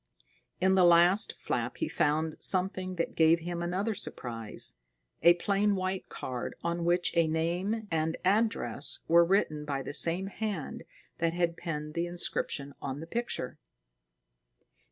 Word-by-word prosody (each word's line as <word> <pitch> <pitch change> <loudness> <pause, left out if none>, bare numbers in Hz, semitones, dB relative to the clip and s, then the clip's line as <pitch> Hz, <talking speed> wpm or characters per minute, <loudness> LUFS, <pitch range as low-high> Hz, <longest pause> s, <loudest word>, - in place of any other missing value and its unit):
In 190 +1 +3
the 190 -1 +5
last 175 +3 +5
flap - - -3
he 320 - -1
found 155 - 0
something 185 0 +1
that 170 - -2
gave 165 +1 +4
him 170 +1 -4
another 185 +6 -1
surprise: 115 - -5 0.5
a 170 0 +7
plain 200 +3 +1
white 185 0 -3
card 125 -2 -5
on 170 0 -1
which 175 +1 +1
a 165 -1 +4
name 175 +7 -1
and 160 0 0
address 190 - +1
were 170 +1 +6
written 170 -5 +1
by 140 -2 -3
the - - -6
same 170 +5 +3
hand 200 -5 -4 0.3
that 165 0 +1
had 170 -1 0
penned 150 -3 -5
the 170 +1 -1
inscription 145 -5 -2
on 135 +1 -4
the 160 - -6
picture. 235 - -4
170 Hz, 145 wpm, -30 LUFS, 160-190 Hz, 0.5 s, a